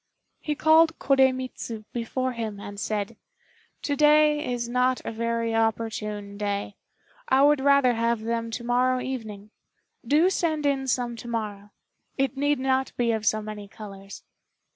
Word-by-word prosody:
He 300 -1 -3
called 320 +2 +4
Koremitz 265 -2 +1 0.2
before 255 +2 -2
him 220 -4 -5
and 200 0 -8
said, 210 +2 -3 0.7
"To 285 - 0
day 300 -1 +4
is 240 -1 -2
not 250 +1 +1
a - - -3
very 230 0 -1
opportune 210 -2 -2
day; 205 -1 -2 0.5
I 265 +1 +5
would 295 0 +5
rather 280 -2 +4
have 230 0 0
them 230 +1 -2
to 235 +1 -5
morrow 250 +1 +2
evening. 215 -6 -6 0.5
Do 305 +9 +3
send 315 -5 0
in 270 -1 0
some 245 -1 -1
to 240 - -9
morrow. 210 -3 -4 0.5
It 270 0 0
need 290 +1 +1
not 265 0 0
be 235 -1 +2
of 220 -1 -2
so 215 0 +2
many 210 -1 -7
colors." 195 -1 -11
240 Hz, 150 wpm, -26 LUFS, 215-270 Hz, 0.7 s, I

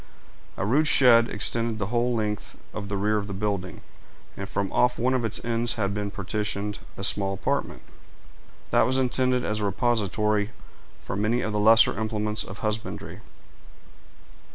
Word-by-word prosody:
A - - -2
rude 145 +9 +2
shed 120 -5 +6
extended 115 +1 0
the 105 +2 -4
whole 120 0 +1
length 105 -2 -3 0.2
of 100 -2 -6
the 100 - -2
rear 105 +2 +1
of 100 -1 -3
the 100 - -5
building, 100 -2 -3 0.5
and 100 0 -6
from 100 -1 -2
off 125 0 +2
one 125 +2 +1
of 130 -2 0
its 110 -1 -1
ends 115 0 0
had 100 -3 -2
been 105 0 -3
partitioned 105 +1 -3 0.2
a 95 - -6
small 95 -1 +2
apartment, - - -3 0.9
that - - +4
was 130 +1 +1
intended 125 -1 +1
as 105 +1 -1
a 105 - -1
repository 105 -1 0 0.5
for - - -6
many 110 +5 0
of 110 - -2
the 105 - 0
lesser 110 0 +6
implements 110 -1 -1
of 95 - -10
husbandry. 110 0 -4
105 Hz, 165 wpm, -25 LUFS, 100-120 Hz, 0.9 s, shed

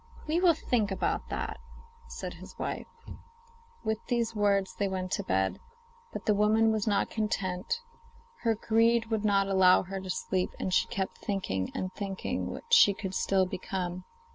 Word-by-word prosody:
'We 320 +3 +2
will 350 -3 +5
think 225 -7 0
about 195 - -1
that,' - - -4 0.5
said - - -6
his - - -12
wife. - - -4 1.0
With 220 0 -1
these 235 -2 0
words 200 -2 +2
they 200 - -1
went 185 -1 -3
to - - -1
bed. 95 0 0 0.5
But - - -6
the 210 - +4
woman 215 +2 +4
was 220 -1 -1
not 205 -2 +1
content; 200 - -2 0.6
her 225 -2 +1
greed 230 +1 +2
would 220 -1 0
not 200 -2 +3
allow 190 -2 +5
her 190 +1 -5
to 190 - -8
sleep, 185 0 -1
and 185 - -2
she - - +3
kept 190 -1 -3
on - - -17
thinking 95 - -1
and 185 0 -3
thinking 195 -2 -3
what 465 - -6
she 205 - +7
could 190 -3 -5
still 190 0 +2
become. 185 -1 -4
200 Hz, 170 wpm, -29 LUFS, 185-220 Hz, 1.0 s, she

